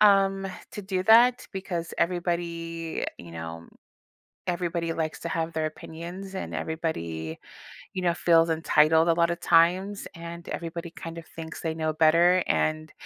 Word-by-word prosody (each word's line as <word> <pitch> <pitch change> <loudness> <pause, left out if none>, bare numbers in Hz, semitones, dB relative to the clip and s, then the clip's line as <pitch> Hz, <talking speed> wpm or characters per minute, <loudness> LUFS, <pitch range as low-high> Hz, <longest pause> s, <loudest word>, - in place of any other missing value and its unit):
um, 195 -2 +5 0.2
to - - -6
do 190 -2 -2
that 235 +4 +6
because 180 -4 -4
everybody, 170 -2 -2
you 85 -1 -11
know, 80 0 -7 0.8
everybody 170 -1 -1
likes 160 -1 -3
to 170 - -4
have 165 0 -2
their 160 -1 0
opinions, 170 +5 -7
and 190 - -4
everybody, 85 - -3 0.6
you 185 - -2
know, 175 -1 +2
feels 165 -1 +4
entitled 160 0 +4
a 165 - +5
lotta 170 0 +2
times, 180 +4 +3
and 170 0 -8
everybody 170 0 -5
kind 165 0 -8
of 165 - -9
thinks 165 0 -8
they 160 -1 -1
know 155 -1 -1
better, 170 +3 +5
and 155 0 0
170 Hz, 145 wpm, -27 LUFS, 160-180 Hz, 0.8 s, that